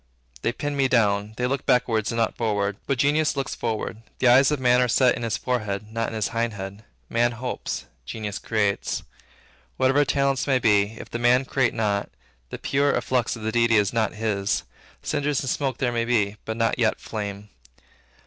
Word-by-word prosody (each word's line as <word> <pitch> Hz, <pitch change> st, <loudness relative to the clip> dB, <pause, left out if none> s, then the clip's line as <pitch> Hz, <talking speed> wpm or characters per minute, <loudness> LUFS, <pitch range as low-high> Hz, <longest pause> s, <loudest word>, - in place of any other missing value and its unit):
They 120 Hz, -, +1 dB
pin 145 Hz, +4 st, -4 dB
me 135 Hz, -1 st, +3 dB
down. 105 Hz, -3 st, +1 dB
They 125 Hz, -, 0 dB
look 135 Hz, +1 st, -2 dB
backward 115 Hz, -3 st, +2 dB
and 115 Hz, -, -3 dB
not 115 Hz, -1 st, +1 dB
forward. 105 Hz, -3 st, -1 dB
But 140 Hz, -, 0 dB
genius 150 Hz, +4 st, +2 dB
looks 135 Hz, -1 st, -2 dB
forward: 110 Hz, -2 st, -3 dB, 0.2 s
the 130 Hz, -, +3 dB
eyes 130 Hz, +2 st, +6 dB
of 150 Hz, -2 st, 0 dB
man 125 Hz, -1 st, +4 dB
are 125 Hz, -, +3 dB
set 125 Hz, +1 st, +4 dB
in -, -, -6 dB
his 115 Hz, -2 st, -1 dB
forehead, 105 Hz, -4 st, -3 dB
not 115 Hz, 0 st, -1 dB
in -, -, -7 dB
his 110 Hz, -2 st, -1 dB
hindhead: 105 Hz, -3 st, -3 dB, 0.2 s
man 120 Hz, +1 st, +1 dB
hopes: 120 Hz, -, -4 dB, 0.2 s
genius 105 Hz, -, -5 dB
creates. 105 Hz, -3 st, -1 dB, 0.7 s
Whatever 135 Hz, +2 st, +4 dB
talents 140 Hz, -1 st, +1 dB
may 135 Hz, -2 st, +3 dB
be, 105 Hz, -2 st, +2 dB
if -, -, -10 dB
the 120 Hz, -, -3 dB
man 125 Hz, +2 st, +4 dB
create 130 Hz, -2 st, +1 dB
not, 105 Hz, -3 st, 0 dB, 0.4 s
the -, -, -6 dB
pure 140 Hz, +1 st, +1 dB
efflux 125 Hz, -2 st, 0 dB
of 115 Hz, -, -9 dB
the 110 Hz, -, -1 dB
Deity 115 Hz, 0 st, +3 dB
is 105 Hz, -1 st, +2 dB
not 110 Hz, -2 st, 0 dB
his; 105 Hz, -2 st, -1 dB, 0.4 s
cinders 145 Hz, -1 st, 0 dB
and 135 Hz, -, -3 dB
smoke 135 Hz, -4 st, -1 dB
there 125 Hz, -2 st, 0 dB
may 115 Hz, -1 st, 0 dB
be, 105 Hz, -4 st, +1 dB
but 110 Hz, 0 st, -4 dB
not 115 Hz, +1 st, +1 dB
yet 110 Hz, -2 st, +2 dB
flame. 105 Hz, -1 st, -6 dB
115 Hz, 195 wpm, -24 LUFS, 105-130 Hz, 0.7 s, eyes